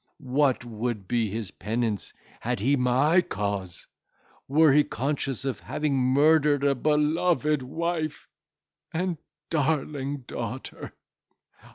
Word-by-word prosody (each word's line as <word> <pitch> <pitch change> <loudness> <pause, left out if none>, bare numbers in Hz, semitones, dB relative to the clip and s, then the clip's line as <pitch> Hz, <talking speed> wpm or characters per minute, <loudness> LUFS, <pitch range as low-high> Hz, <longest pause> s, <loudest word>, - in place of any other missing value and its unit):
What 135 -3 +2
would 115 -3 -4
be 115 -1 +1
his 105 -2 -4
penance, 110 0 -2 0.3
had - - -2
he 135 +8 +3
my 135 +7 +3
cause! 100 - -4 0.6
were 155 +2 +5
he 150 +1 +6
conscious 135 -2 -2
of 135 - -2
having 150 -2 -1
murdered 145 +2 +4
a 140 -1 +4
beloved 150 +2 +2
wife 160 +3 -3 0.6
and 175 -1 -2 0.3
darling 145 -2 -1
daughter! 120 +2 -6
140 Hz, 105 wpm, -26 LUFS, 120-150 Hz, 0.6 s, he